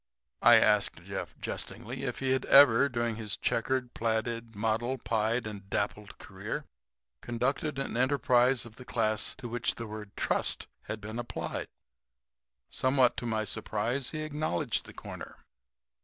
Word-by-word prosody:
I - - +8
asked - - +3
Jeff, - - -6
jestingly, 125 +4 -5
if 125 - -2
he 130 -1 +1
had 130 0 +1
ever, 140 -1 +7
during 120 -2 -1
his 105 -3 -4
checkered, 125 +1 0
plaided, 115 0 -1
mottled, 115 +4 -1
pied 115 +1 +1
and 100 -2 -7
dappled 105 0 -2
career, - - -5 0.6
conducted 135 +5 -1
an 135 - -3
enterprise 130 -1 +3
of 110 -2 -13
the 125 - -9
class 110 -3 +1
to 130 -2 -7
which 120 0 0
the 115 - -5
word 105 -2 -8
"trust" - - +1 0.2
had 110 -1 -5
been 110 +3 -5
applied. 120 - -4 1.0
Somewhat 130 -1 +3
to 120 - -3
my 110 -1 0
surprise 115 +5 -1
he 155 -1 -4
acknowledged 150 - -1
the - - -10
corner. - - -8
120 Hz, 145 wpm, -30 LUFS, 110-130 Hz, 1.0 s, I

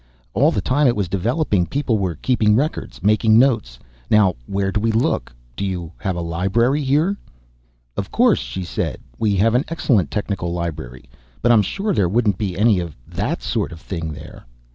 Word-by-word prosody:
All - - +4
the - - -1
time 145 +2 +2
it 120 - +3
was 100 -3 -1
developing, 100 - 0
people 130 -6 0
were 90 -4 -1
keeping 105 - +2
records, 145 +7 -2
making 110 +1 +4
notes. 115 - +2 0.3
Now 105 -4 +4
where 95 0 -1
do 105 - 0
we 115 +2 +1
look? 110 +2 0 0.2
Do - - -4
you 90 -4 -3
have 95 -2 -2
a 85 - -3
library 95 - +1
here?" 150 +9 +1 0.8
"Of - - -3
course," - - +3
she 60 +10 -5
said. 85 - -3 0.2
"We 105 -2 +2
have 110 +4 +3
an 125 +3 +3
excellent 115 - +1
technical 100 -3 -3
library. 80 -8 -5 0.4
But 120 - +4
I'm 115 -3 +6
sure 200 - -2
there 95 - +2
wouldn't 105 -2 +1
be 95 -4 -2
any 105 -2 +4
of 85 -4 -6
that - - -3
sort - - -1
of 85 - -9
thing 80 -3 -5
there." 75 -4 -11
105 Hz, 185 wpm, -20 LUFS, 85-120 Hz, 0.8 s, I'm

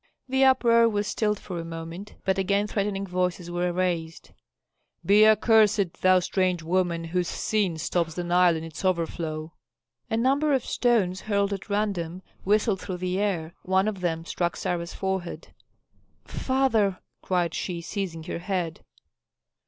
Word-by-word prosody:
The 265 +1 +2
uproar 235 -3 +5
was 205 -1 -1
stilled 210 -1 0
for 180 -3 -6
a - - -4
moment, 165 +4 -8
but 190 0 +1
again 200 +2 +1
threatening 200 -1 -2
voices 180 -1 -2
were 175 0 0
raised, 170 -2 -2 0.7
"Be 210 +2 +6
accursed, 215 -4 +3
thou 185 0 +6
strange 180 -1 0
woman 170 0 0
whose 175 +1 -1
sin 195 -5 -1
stops 165 0 -1
the 175 - -3
Nile 175 0 +4
in 160 - -4
its 165 +3 -8
overflow!" 165 -3 -2 0.6
A 225 - 0
number 280 +5 +2
of 260 -3 +1
stones 205 -7 +1
hurled 200 -1 0
at 195 +2 -7
random 190 -4 -2 0.2
whistled 210 0 +2
through 185 - -4
the 180 +1 -2
air; 175 -6 -1
one 190 +2 +1
of 200 -4 -3
them 165 -2 -1
struck 175 0 -1
Sarah's 170 -1 -3
forehead. 190 -2 -4 0.7
"Father!" 230 -8 +1 0.2
cried 180 -2 0
she, 175 -2 -3
seizing 170 -2 -4
her 165 - -5
head. 175 -3 -3
185 Hz, 150 wpm, -26 LUFS, 170-205 Hz, 0.7 s, Be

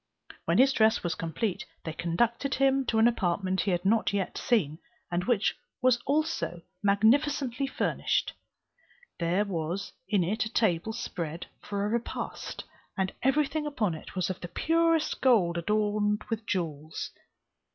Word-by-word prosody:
When - - +2
his 270 +2 +6
dress 220 -1 +3
was 175 - 0
complete, 175 +5 -2 0.2
they 160 - -4
conducted 235 - 0
him 270 -1 +2
to 225 - +1
an 220 +1 +6
apartment 190 -4 0
he - - -1
had 175 0 0
not 215 +1 +3
yet 200 -2 -1
seen, 160 -10 +1 0.3
and 175 +1 0
which 230 -4 +2 0.5
also 310 - 0
was 170 -1 -13 0.2
magnificently 250 +6 +2
furnished. - - 0 0.9
There 175 +4 +1
was 175 0 -3 0.2
in 200 -4 +3
it 215 +6 0
a - - -10
table 220 -3 +1
spread 170 -5 -4
for 200 -1 -3
a - - 0
repast, 235 +1 -4 0.3
and 190 -1 0
everything 300 +3 +1
upon 220 - 0
it 160 - -9
was 185 0 0
of 185 - -7
the 175 - -5
purest 330 - +1
gold 205 -10 +4
adorned 210 +2 +1
with 225 -1 -3
jewels. 160 -5 -3
210 Hz, 150 wpm, -29 LUFS, 175-240 Hz, 0.9 s, his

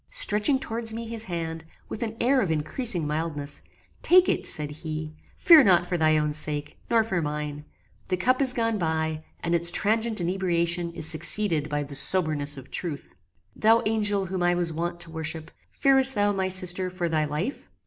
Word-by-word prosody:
Stretching 280 - +2
towards 225 -3 -2
me 230 0 -5
his 225 0 -5
hand, 165 -2 -5 0.2
with - - -7
an 225 -1 -4
air 260 +2 +2
of 195 - -2
increasing 165 - -1
mildness: 150 -2 -3 0.4
"Take 365 +1 +4
it," - - -1
said 150 -1 +2
he: 155 0 -7 0.2
"Fear 325 -4 +7
not 175 -2 +4
for 180 - -3
thy 155 -2 +2
own 150 -1 -1
sake, 150 -1 -3
nor 230 -1 +3
for 190 -6 -2
mine. 150 -1 -5 0.4
The 185 - 0
cup 255 +8 +1
is 265 -2 +3
gone 230 -3 -1
by, 160 -2 -2 0.2
and 170 - -2
its 170 0 +3
transient 220 +3 0
inebriation 175 -1 0
is 165 - -3
succeeded 165 -1 +2
by 145 0 -2
the 140 0 -10
soberness 150 -2 +1
of 135 0 -12
truth. 160 -6 -6 0.4
"Thou 225 +2 +3
angel 205 -2 +1
whom 185 0 -4
I 175 0 +2
was 175 -2 -1
wont 170 +2 -4
to 165 - -5
worship! 160 0 -5 0.2
fearest 270 -1 +5
thou, 205 0 +1
my 190 -1 -2
sister, 185 0 +2
for 180 -1 -4
thy 155 -2 0
life? 155 - -5
175 Hz, 185 wpm, -25 LUFS, 155-215 Hz, 0.4 s, Fear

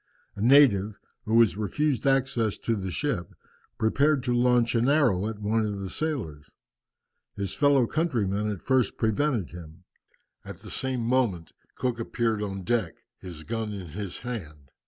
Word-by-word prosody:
A 100 - -7
native, 110 -6 +5 0.3
who 110 - 0
was 115 -4 +5
refused 140 +7 -1
access 135 -5 +1
to 115 - -1
the 95 -2 -4
ship, 105 -3 -3 0.4
prepared 140 +5 +2
to 125 -2 0
launch 120 -1 +3
an 120 +2 +2
arrow 120 -10 +3
at 110 -1 -5
one 105 +2 0
of 105 -2 -3
the 95 -1 -5
sailors. 105 - -4 0.9
His 100 -1 -3
fellow 145 -3 +4
countrymen 110 - -1
at 100 -4 -5
first 130 -4 +1
prevented 110 - 0
him. 85 0 -11 0.6
At - - -8
the - - -10
same 130 -2 -1
moment 115 -9 0 0.2
Cook 125 -2 -2
appeared 115 -1 -1
on 95 -2 -4
deck, 105 -4 -1 0.2
his 85 -4 -8
gun 110 +1 -3
in 95 -4 -7
his 100 +3 -6
hand. 80 - -7
110 Hz, 155 wpm, -27 LUFS, 95-125 Hz, 0.9 s, native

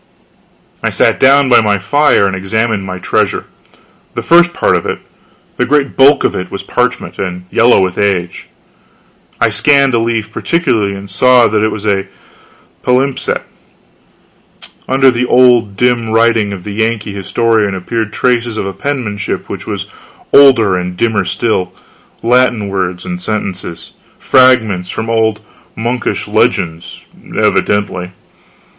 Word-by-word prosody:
I - - 0
sat - - +1
down 140 +1 +4
by 125 -2 +5
my 105 -2 +1
fire 145 +3 +2
and 95 -1 -1
examined 105 +2 -2
my 95 0 -5
treasure. 90 - -1 0.7
The - - -3
first 175 +1 +4
part - - +1
of - - -2
it - - -2 0.6
the - - +1
great 140 0 +1
bulk 135 +2 +5
of - - 0
it 90 - -4
was - - -6
parchment, - - -2
and 90 -1 -4
yellow 120 -3 +4
with 90 -1 -3
age. 90 -8 -1 0.9
I 115 - +3
scanned 135 +5 +2
a 115 - +2
leaf 115 -2 -2
particularly 115 - -1
and 100 0 -9
saw 125 +5 +4
that 105 0 0
it 110 - +2
was 105 -1 -6
a 100 -2 0 0.7
palimpsest. 130 +2 0 1.5
Under 135 0 +4
the 125 +1 -1
old 120 -5 +3
dim 120 -1 +1
writing 115 -2 +2
of 95 -3 -7
the 105 - -6
Yankee 110 -1 -2
historian 105 +1 0
appeared 105 +3 -3
traces 120 -1 -1
of - - -2
a 95 - -4
penmanship 120 -8 -4
which - - -7
was - - -4 0.5
older 120 -9 +5
and 90 0 -5
dimmer 105 -3 0
still 95 -2 -1 0.5
Latin 120 -3 +2
words 95 -2 -3
and 180 0 -5
sentences: 95 - -5 0.2
fragments 110 -8 +2
from 110 +1 -4
old 110 -1 0 0.3
monkish 120 +2 -3
legends, 80 -1 -1 0.3
evidently. 95 -3 0
110 Hz, 140 wpm, -13 LUFS, 100-125 Hz, 1.5 s, by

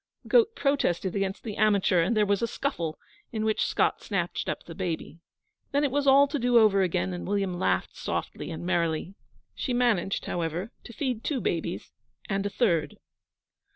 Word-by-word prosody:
The - - -14
goat 460 -2 +4
protested 250 - 0
against 195 0 -2
the 215 -3 -5
amateur, 200 -4 +3
and 200 +7 +1
there 210 - +4
was 200 -1 +1
a 235 - +1
scuffle, 170 - -3 0.3
in 220 -1 -2
which 220 0 +1
Scott - - +1
snatched 175 -5 -2
up - - -3
the 165 - -9
baby. 170 -2 -4 0.5
Then 285 +1 +3
it 285 - +1
was 285 +1 0
all 275 +1 +7
to 290 0 -2
do 245 0 +3
over 210 -3 +5
again, 95 - 0
and 85 -1 -5
William 195 -3 -1
laughed - - 0
softly - - -4
and 165 0 -6
merrily. 170 0 0 0.4
She 255 - -3
managed, 220 -6 +1
however, 175 +5 -3
to 235 - -10
feed 245 -1 -2
two 285 -4 -1
babies, - - -3 0.4
and 195 -2 -1
a - - -3
third. 185 -8 +1
200 Hz, 185 wpm, -27 LUFS, 175-245 Hz, 0.5 s, all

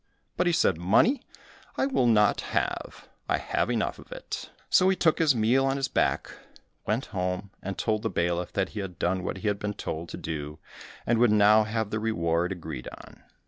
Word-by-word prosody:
But 180 - +1
he - - +4
said, 95 - +2
"Money, 115 - +3 0.6
I - - +2
will 260 - +2
not 105 -3 +4 0.2
have, - - -3 0.2
I - - +3
have - - -1
enough - - -1
of - - -15
it." - - -6 0.2
So 185 - +4
he 190 - +3
took 160 -4 +2
his 155 -5 +4
meal 120 +4 +3
on 135 +1 0
his 135 0 0
back, - - 0 0.6
went 115 +5 0
home, 90 +1 -2
and 100 +1 -5
told 110 -2 0
the 115 - -1
bailiff 85 -1 -1
that 95 -1 0
he 105 - -6
had 95 -3 -6
done 90 +1 0
what 95 - -3
he 95 - -4
had 100 -1 0
been 105 0 -3
told 85 -3 -5
to - - -6
do, 75 -1 -5 0.5
and 120 -1 +2
would 120 -1 +5
now 105 +1 +5
have 110 -1 -2
the 110 - -1
reward 85 -5 0
agreed 80 -8 -6
on. - - -15
105 Hz, 205 wpm, -27 LUFS, 90-115 Hz, 0.6 s, would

